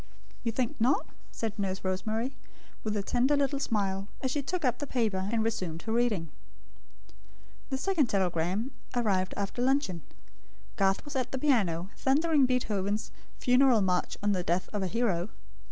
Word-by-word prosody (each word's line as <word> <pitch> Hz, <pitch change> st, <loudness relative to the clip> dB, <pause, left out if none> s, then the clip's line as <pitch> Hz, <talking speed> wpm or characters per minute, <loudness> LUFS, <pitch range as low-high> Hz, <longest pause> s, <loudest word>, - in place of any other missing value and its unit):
"You 230 Hz, -, 0 dB
think 255 Hz, +5 st, -1 dB
not?" 255 Hz, +5 st, +3 dB, 0.3 s
said 225 Hz, -2 st, -4 dB
Nurse 190 Hz, -1 st, -2 dB
Rosemary, 220 Hz, +7 st, -1 dB, 0.5 s
with 215 Hz, -1 st, -1 dB
a 200 Hz, -, -1 dB
tender 260 Hz, +7 st, +2 dB
little 280 Hz, 0 st, +1 dB
smile, 195 Hz, -5 st, 0 dB
as 260 Hz, -, 0 dB
she 290 Hz, -, 0 dB
took 340 Hz, +2 st, -2 dB
up 250 Hz, -1 st, +1 dB
the 290 Hz, -, -3 dB
paper, 205 Hz, -7 st, 0 dB
and 225 Hz, -1 st, +2 dB
resumed 185 Hz, -7 st, -2 dB
her 220 Hz, -, -3 dB
reading. 220 Hz, -9 st, +1 dB, 1.4 s
The 265 Hz, -, -1 dB
second 320 Hz, -2 st, +2 dB
telegram 190 Hz, -, 0 dB, 0.2 s
arrived 195 Hz, -6 st, +1 dB
after 200 Hz, +4 st, -2 dB
luncheon. 260 Hz, -, +1 dB, 0.7 s
Garth 195 Hz, +4 st, +2 dB
was 290 Hz, -, -7 dB
at 255 Hz, -2 st, -1 dB
the 265 Hz, -, -1 dB
piano, 200 Hz, -, +1 dB
thundering 290 Hz, 0 st, +3 dB
Beethoven's 215 Hz, -4 st, 0 dB, 0.3 s
Funeral 250 Hz, -2 st, +5 dB
March 180 Hz, -2 st, 0 dB
on 205 Hz, -, +3 dB
the 185 Hz, -2 st, +1 dB
Death 175 Hz, +2 st, 0 dB
of 205 Hz, -, -1 dB
a 190 Hz, -, 0 dB
Hero. 200 Hz, -4 st, 0 dB
220 Hz, 160 wpm, -30 LUFS, 190-260 Hz, 1.4 s, Funeral